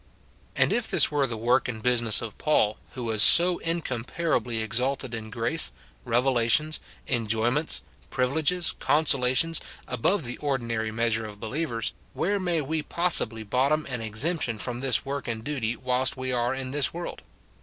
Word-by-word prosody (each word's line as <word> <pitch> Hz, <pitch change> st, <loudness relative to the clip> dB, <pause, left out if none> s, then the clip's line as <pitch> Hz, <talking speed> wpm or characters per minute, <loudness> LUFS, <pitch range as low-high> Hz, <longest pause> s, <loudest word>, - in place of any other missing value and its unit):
And -, -, +3 dB
if 240 Hz, -2 st, -1 dB
this -, -, +3 dB
were 145 Hz, -2 st, +1 dB
the 115 Hz, -3 st, -5 dB
work 120 Hz, +4 st, +2 dB
and 115 Hz, -3 st, -4 dB
business 120 Hz, -2 st, +2 dB
of 110 Hz, -3 st, -6 dB
Paul, 110 Hz, -9 st, +2 dB
who 125 Hz, -, -6 dB
was 110 Hz, -2 st, 0 dB
so 175 Hz, +8 st, +6 dB
incomparably 130 Hz, -5 st, -2 dB
exalted 125 Hz, +3 st, -2 dB
in 110 Hz, -1 st, -5 dB
grace, 120 Hz, +8 st, 0 dB, 0.3 s
revelations, 125 Hz, +5 st, +2 dB, 0.3 s
enjoyments, 120 Hz, +6 st, +1 dB, 0.3 s
privileges, 160 Hz, +7 st, 0 dB
con 155 Hz, +2 st, +2 dB
solations, 140 Hz, +4 st, +3 dB, 0.3 s
above 145 Hz, -, 0 dB
the 120 Hz, 0 st, -5 dB
ordinary 115 Hz, -6 st, -2 dB
measure 110 Hz, 0 st, 0 dB
of 105 Hz, -1 st, -10 dB
believers, 115 Hz, 0 st, -3 dB, 0.2 s
where 200 Hz, +2 st, 0 dB
may 175 Hz, -4 st, 0 dB
we 155 Hz, +3 st, -2 dB
possibly 150 Hz, -10 st, +2 dB
bottom 135 Hz, +8 st, +1 dB
an 125 Hz, -2 st, -3 dB
exemption 115 Hz, +3 st, 0 dB
from 120 Hz, +2 st, -3 dB
this 130 Hz, -1 st, +1 dB
work 140 Hz, 0 st, -4 dB
and 110 Hz, -2 st, -4 dB
duty 125 Hz, -5 st, -2 dB
whilst 125 Hz, +2 st, 0 dB
we 130 Hz, 0 st, -3 dB
are 120 Hz, +1 st, 0 dB
in 130 Hz, -1 st, -5 dB
this 145 Hz, 0 st, +2 dB
world 175 Hz, 0 st, -6 dB
125 Hz, 155 wpm, -26 LUFS, 115-150 Hz, 0.3 s, so